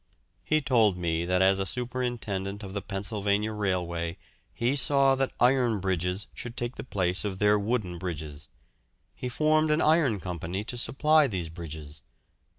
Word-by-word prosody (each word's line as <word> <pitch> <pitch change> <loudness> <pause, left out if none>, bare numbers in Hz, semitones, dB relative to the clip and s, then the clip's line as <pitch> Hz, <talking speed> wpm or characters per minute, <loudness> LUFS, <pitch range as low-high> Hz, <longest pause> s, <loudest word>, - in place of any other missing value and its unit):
He 155 0 +2
told 115 -8 +3
me 85 -1 -1
that 90 +1 +2
as 95 0 +4
a 95 - 0
superintendent 115 -4 -3
of 95 -1 -7
the 100 - -3
Pennsylvania 100 +2 -1
Railway 90 -4 -2 0.3
he 125 +3 0
saw 140 -1 +4
that 135 0 0
iron 125 -4 +3
bridges 90 +1 -1
should 120 -1 -7
take 120 +1 -3
the - - -6
place 90 -6 0
of 100 -3 -3
their 105 +1 +3
wooden 100 -5 -2
bridges. 75 -4 -6 0.6
He 125 - -5
formed 155 +4 +2
an 150 +1 +3
iron 155 -10 +3
company 90 +2 -4
to 120 - -5
supply 150 +5 +3
these 90 -8 -3
bridges. 80 -3 -8
100 Hz, 155 wpm, -28 LUFS, 90-125 Hz, 0.6 s, as